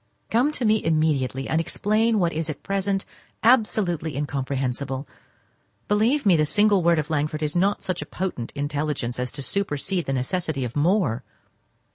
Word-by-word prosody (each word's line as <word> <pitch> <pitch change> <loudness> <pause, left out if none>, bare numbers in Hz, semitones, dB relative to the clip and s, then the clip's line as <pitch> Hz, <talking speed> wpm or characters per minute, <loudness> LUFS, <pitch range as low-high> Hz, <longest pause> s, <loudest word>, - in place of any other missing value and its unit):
Come 245 +6 +3
to 250 - -1
me 215 0 +3
immediately, 150 -5 +1
and 160 +1 +1
explain 215 +6 +1
what 175 -4 +1
is 160 0 -2
at 150 - -6
present 195 0 -1 0.4
absolutely 205 - +2
incomprehensible. 135 -1 -2 0.8
Believe 225 +7 +2
me, 190 -4 +6
the 155 - +3
single 205 +5 +3
word 170 0 +4
of 155 +1 -2
Langford 155 0 -1
is 150 +1 -2
not 195 +3 +2
of - - -22
such 185 -2 -3
potent 175 -11 -4
intelligence 145 -4 -2
as 125 0 -2
to 140 - -5
supersede 185 +2 -1
the 135 - 0
necessity 140 +1 -1
of 120 - -6
more. 145 - +2
160 Hz, 160 wpm, -24 LUFS, 140-200 Hz, 0.8 s, me